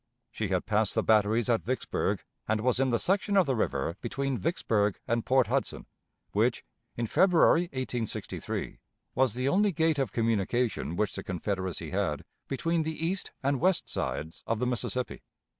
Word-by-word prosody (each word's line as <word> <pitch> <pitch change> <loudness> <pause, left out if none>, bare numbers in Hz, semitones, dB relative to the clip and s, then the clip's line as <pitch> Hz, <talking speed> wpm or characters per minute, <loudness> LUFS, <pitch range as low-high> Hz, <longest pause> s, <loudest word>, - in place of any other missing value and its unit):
She 110 -1 -2
had 90 -2 0
passed 110 -1 +1
the - - +2
batteries 110 +1 +3
at 115 -2 +2
Vicksburg, 130 +2 -1 0.2
and 110 0 +1
was 125 +1 +2
in 135 -1 +3
the 120 - +2
section 200 - +1
of 190 - +6
the 135 -3 0
river 80 - -1
between 135 +3 -2
Vicksburg 110 - 0
and 115 0 +1
Port 130 -1 +4
Hudson, - - -2 0.5
which, - - +1 0.3
in 120 - 0
February, 175 - +4
1863, 125 -4 -4 0.3
was 130 -4 +2
the 125 +1 -1
only 200 +7 +3
gate 160 -3 +1
of 130 -7 0
communication 115 - 0
which 105 +2 0
the - - -4
Confederacy 95 -2 -3
had 95 -7 -1 0.2
between 165 +4 0
the 160 +1 -3
east 185 +3 -2
and 140 0 +1
west 185 -1 +2
sides 80 +2 -3
of 115 - +1
the 125 - -1
Mississippi. 125 +1 -2
120 Hz, 165 wpm, -29 LUFS, 105-140 Hz, 0.5 s, of